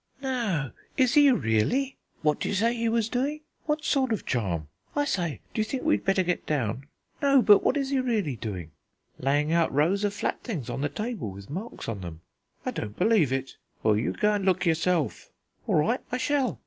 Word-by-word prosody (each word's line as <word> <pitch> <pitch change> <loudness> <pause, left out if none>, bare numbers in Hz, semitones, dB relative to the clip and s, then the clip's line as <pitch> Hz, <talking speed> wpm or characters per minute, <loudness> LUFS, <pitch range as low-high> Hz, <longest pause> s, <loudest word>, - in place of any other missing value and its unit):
"No, 230 - -1 0.3
is 255 -3 +4
he 290 -2 +7
really?" 245 - +1 0.3
"What 150 -1 +2
d'you - - -1
say 230 +5 +2
he 230 -1 0
was 225 -1 +1
doing?" 275 +6 -1 0.3
"What 300 0 0
sort 265 -3 +2
of 220 - -1
charm?" 90 - -1 0.3
"I 290 0 +2
say, 175 - -1
d'you 220 - +1
think 250 +4 -4
we'd 315 - +2
better 195 -1 +2
get 180 0 -2
down?" 135 -2 -1 0.3
"No, 275 -3 +5
but 205 -1 +7
what - - +2
is 275 -1 -1
he 275 - +2
really 215 - 0
doing?" 95 -8 -6 0.5
"Laying 145 +4 +1
out 170 -1 +3
rows 170 +8 +2
of 205 -1 0
flat - - -2
things 165 - -4
on - - -3
the 145 - 0
table, 215 - -4
with 100 +3 -10
marks 195 +9 -6
on 110 -4 -4
them." 85 -3 -8 0.4
"I - - 0
don't 105 0 -5
believe 190 - +3
it." 135 0 -3 0.3
"Well, 110 -1 +4
you 110 +3 0
go 210 0 +2
and 205 -1 -1
look 185 0 +2
yourself." 165 -1 0 0.4
"All - - +2
right, 220 +12 +2
I 250 - 0
shall." 260 -2 0
195 Hz, 200 wpm, -27 LUFS, -, 0.5 s, he